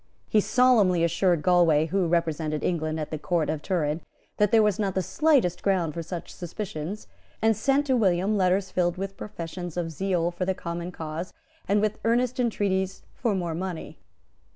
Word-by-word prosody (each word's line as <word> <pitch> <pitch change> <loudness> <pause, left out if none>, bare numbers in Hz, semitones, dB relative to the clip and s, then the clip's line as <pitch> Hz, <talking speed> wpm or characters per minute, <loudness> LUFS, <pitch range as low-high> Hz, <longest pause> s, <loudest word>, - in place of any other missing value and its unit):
He 215 - +3
solemnly 215 -9 +4
assured 170 -1 +2
Galway, 170 -4 +4
who 180 +2 0
represented 160 -2 0
England 155 -2 -1
at 155 - -4
the 155 - -3
Court 170 -1 0
of 155 - -4
Turin, 155 -3 -1 0.4
that 210 -1 +3
there 225 -1 +6
was 210 -2 +1
not 195 -3 -1
the 190 - +1
slightest 270 - +2
ground 180 -6 +1
for 170 - -4
such 170 +1 -7
suspicions, 180 +1 -6 0.3
and 220 0 +3
sent 275 +6 +2
to 265 -2 +2
William 195 -2 +2
letters 185 0 +1
filled 175 -1 0
with 195 +1 -4
professions 175 -3 -7
of 165 -2 -2
zeal 175 0 0
for 175 +1 -4
the 190 +1 0
common 170 0 -5
cause, 160 +1 -6 0.3
and 205 +1 +3
with 215 0 0
earnest 245 +2 +1
entreaties 195 -5 0
for 230 -5 -1
more 175 -3 -2
money. 180 0 -5
180 Hz, 175 wpm, -26 LUFS, 170-205 Hz, 0.4 s, there